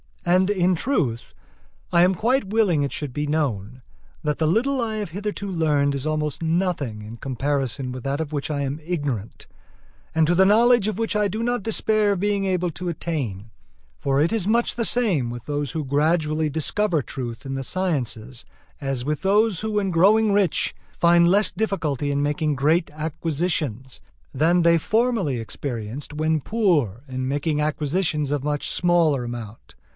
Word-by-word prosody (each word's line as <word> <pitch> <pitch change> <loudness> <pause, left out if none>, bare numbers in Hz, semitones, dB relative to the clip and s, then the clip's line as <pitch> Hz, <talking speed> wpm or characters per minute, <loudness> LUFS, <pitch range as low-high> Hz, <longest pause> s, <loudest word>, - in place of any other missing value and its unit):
And 185 +2 +3
in 185 -2 +2
truth, 160 - -1 0.6
I 170 - +5
am 185 +1 +3
quite 240 +5 +1
willing 195 -6 +2
it 140 - -2
should 145 -3 -4
be 145 +2 -2
known 130 -6 -2 0.4
that 150 -1 0
the 160 - +2
little 255 - +1
I 220 -2 -2
have 210 -4 -3
hitherto 205 +2 -4
learned 150 -5 +1
is 140 0 -4
almost 150 -1 -2
nothing 160 - -1
in 110 +2 -9
comparison 135 0 -2
with 125 -1 -7
that 140 +2 -2
of 155 -2 -4
which 145 -1 -3
I 145 -2 -1
am 140 +2 -3
ignorant, 145 - -4 0.7
and 160 0 +4
to 175 - +3
the 190 +2 +5
knowledge 230 +1 +5
of 215 - -2
which 225 -1 -1
I 210 -1 +2
do 215 +4 -3
not 245 -2 -1
despair 215 -1 +1
of 195 - -3
being 200 0 0
able 180 -2 0
to 180 +2 -5
attain; 125 - -4 0.5
for 140 +1 +1
it 160 - +2
is 220 -5 0
much 235 +2 +2
the 235 - 0
same 195 - +1
with 120 0 -7
those 145 -1 -2
who 160 -2 -3
gradually 155 +2 +1
discover 160 +3 0
truth 120 0 -6
in 135 - -4
the 135 - -3
sciences, 130 -8 -2 0.3
as 135 -3 -2
with 150 0 -2
those 205 -1 +3
who 220 0 -3
when 200 -2 0
growing 205 +5 +4
rich 200 -5 +1 0.2
find 170 0 +5
less 200 +3 +3
difficulty 160 - -1
in 140 0 0
making 150 +1 0
great 155 +5 +2
acquisitions, 155 - -2 0.3
than 165 +6 +3
they 170 0 +5
formerly 220 - +1
experienced 120 +3 -5
when 155 0 0
poor 150 - +1
in 130 0 -3
making 145 +2 -1
acquisitions 150 0 -1
of 145 -2 -1
much 145 0 -1
smaller 170 -7 +2
amount. 120 -2 -8
155 Hz, 175 wpm, -23 LUFS, 140-190 Hz, 0.7 s, I